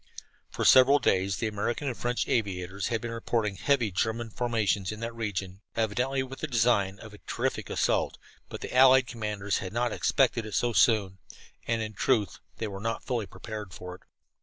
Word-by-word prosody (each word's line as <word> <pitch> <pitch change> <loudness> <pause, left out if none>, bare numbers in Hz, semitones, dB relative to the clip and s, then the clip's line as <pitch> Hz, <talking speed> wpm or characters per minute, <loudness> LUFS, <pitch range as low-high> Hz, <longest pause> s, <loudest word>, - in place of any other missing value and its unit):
For - - -3
several 130 +2 +7
days 95 -7 +1
the - - -2
American 110 +6 -2
and 125 - -2
French 120 +1 -1
aviators 95 -3 -1
had 115 -2 -1
been 120 - -4
reporting 115 -3 -1
heavy 125 -5 +1
German 110 +4 -1
formations 105 -5 0
in 105 - -7
that 115 0 -4
region, 100 -4 -4
evidently 125 +5 0
with 135 0 -9
the 155 - -3
design 110 -6 +2
of 110 0 -12
a 105 - -13
terrific - - -2
assault, - - 0 0.3
but - - -7
the - - -6
allied 130 0 +7
commanders 105 -4 -2
had 95 0 -6
not 120 0 0
expected 125 -2 +2
it 110 -2 -6
so 120 -1 +1
soon, 100 -5 +3 0.5
and 115 -1 0
in 110 0 -6
truth 105 -4 +1 0.2
they 115 - -3
were 100 -1 -6
not 115 +1 -2
fully 120 -6 -2
prepared 105 -5 -8
for 90 0 -8
it. 90 - -13
110 Hz, 185 wpm, -28 LUFS, 100-120 Hz, 0.5 s, several